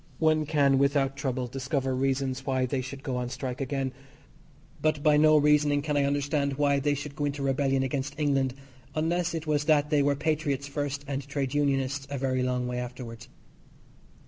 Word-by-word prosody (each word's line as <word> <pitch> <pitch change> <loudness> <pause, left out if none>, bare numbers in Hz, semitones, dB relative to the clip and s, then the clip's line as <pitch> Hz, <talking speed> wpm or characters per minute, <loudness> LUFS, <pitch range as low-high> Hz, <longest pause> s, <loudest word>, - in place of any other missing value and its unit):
One 155 -1 +2
can 140 -3 +3
without 140 -1 +2
trouble 130 -2 -2
discover 130 +1 -2
reasons 135 0 -1
why 130 -2 0
they 130 +1 -1
should 135 +1 -8
go 130 -4 -2
on 125 -1 -2
strike 130 0 -5
again, 135 -1 -2 0.9
but 155 -2 +1
by 150 -1 +5
no 155 +1 +6
reasoning 150 -1 +3
can 150 -1 -1
I 140 -1 +3
understand 140 0 0
why 140 -1 +3
they 145 +1 +1
should 145 0 -6
go 145 - -1
into 140 -1 -2
rebellion 135 0 +1
against 135 +2 -3
England, 135 -3 +1 0.4
unless 170 +2 0
it 160 -1 -4
was 150 -1 0
that 150 -1 +3
they 150 -1 +4
were 140 0 +2
patriots 145 -2 -1
first 145 0 -3
and 140 -1 -4
trade 140 -2 -2
unionists 135 -1 0
a 140 - -3
very 130 -1 0
long 125 0 0
way 125 0 -2
afterwards. 125 -2 -7
140 Hz, 185 wpm, -28 LUFS, 130-145 Hz, 0.9 s, no